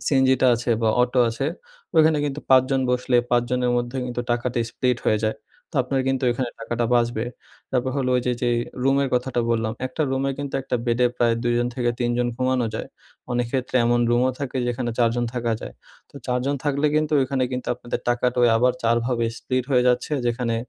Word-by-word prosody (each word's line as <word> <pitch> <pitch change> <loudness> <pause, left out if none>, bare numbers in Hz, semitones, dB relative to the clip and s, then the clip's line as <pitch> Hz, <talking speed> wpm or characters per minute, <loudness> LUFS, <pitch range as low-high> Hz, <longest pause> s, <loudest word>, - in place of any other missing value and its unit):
সিনজিটা 130 -2 +3
আছে 120 +1 -2
বা 110 - +3
অটো 125 +1 0
আছে 115 +4 -2 0.5
ওইখানে 155 -1 +5
কিন্তু 145 0 -3
৫ 130 -1 +7
জন 135 -1 +2
বসলে 125 0 +1
৫ 120 0 +4
জনের 125 -1 +1
মধ্যে 120 +2 -2
কিন্তু 120 -1 -3
টাকাটি 120 0 0
স্প্লিট 125 0 0
হয়ে 110 - +3
যায়, 110 - 0 0.3
তো - - -23
আপনার 135 +1 -1
কিন্তু 135 -1 0
ওইখানে 120 0 -1
টাকাটা 120 0 -2
বাঁচবে। 120 -1 +1 0.5
তারপর 130 0 0
হলো 130 -2 0
ওই - - +2
যে 125 - +2
যেই 120 -1 +2 0.3
রুমের 135 +1 +2
কথাটা 125 0 0
বললাম। 110 -1 0
একটা 130 +5 -3
রুমে 135 +1 0
কিন্তু 140 -1 -5
একটা 125 - -1
বেডে 120 +1 +3
প্রায় 120 -1 +3
২ 120 - +1
জন 120 - +1
থেকে 120 -2 0
৩ 120 -1 +1
জন 125 - +1
ঘুমানো 130 -2 +1
যায়। - - -4 0.4
অনেক 120 0 0
ক্ষেত্রে 130 -1 -1
এমন 120 0 +2
রুমও 125 +2 +3
থাকে 135 -2 -4
যেখানে 120 0 -2
৪ 115 -1 +4
জন 120 - 0
থাকা 120 -2 -1
যায়। - - -8 0.4
তো - - -31
৪ 125 -1 +1
জন 140 - +1
থাকলে 145 0 +1
কিন্তু 155 0 +1
ওইখানে 130 0 0
কিন্তু 125 0 -4
আপনাদের 120 0 -5
টাকাটা 125 +1 +1 0.2
আবার 125 +2 +3
৪ 115 0 +3
ভাবে 120 -2 0
স্প্লিট 130 -1 -2
হয়ে 125 -2 +4
যাচ্ছে, 125 +4 0
যেখানে 120 -1 0
125 Hz, 205 wpm, -23 LUFS, 120-130 Hz, 0.5 s, ৫